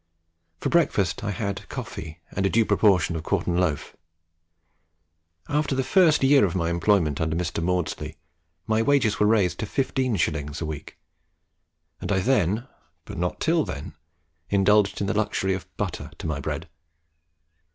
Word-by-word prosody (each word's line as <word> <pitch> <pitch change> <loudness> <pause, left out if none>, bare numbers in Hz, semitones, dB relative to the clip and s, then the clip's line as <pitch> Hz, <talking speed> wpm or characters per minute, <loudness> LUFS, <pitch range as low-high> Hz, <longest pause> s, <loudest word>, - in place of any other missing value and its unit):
For - - -1
breakfast 105 - +1
I 105 - -2
had 100 0 -4
coffee 80 +1 -7
and 95 - -2
a 95 - +3
due 115 +2 +3
proportion 90 -7 +3
of 80 - -3
quartern 85 0 -1
loaf. 80 -5 -1 1.5
After 145 -1 0
the 130 - +1
first 165 -3 +4
year 135 +1 +6
of 95 -3 +1
my 85 -2 0
employment 85 -4 +2
under 80 0 0
Mr. 85 -1 -2
Maudslay, 80 -3 -2 0.5
my 110 0 +1
wages 115 -5 +2
were 105 - +4
raised 105 -5 +2
to 110 - -3
15s. 85 - -1
a 85 - -3
week, 75 +2 -7 1.0
and - - -4
I 100 - +2
then, 110 +1 +1 0.4
but - - -7
not 90 0 -2
till 165 -1 +2
then, 70 - -6 0.6
indulged 100 +1 +3
in - - +1
the 100 - 0
luxury 105 -2 0
of 95 - -5
butter - - -3
to - - -8
my 75 -3 -2
bread. - - -4
95 Hz, 155 wpm, -25 LUFS, 85-110 Hz, 1.5 s, year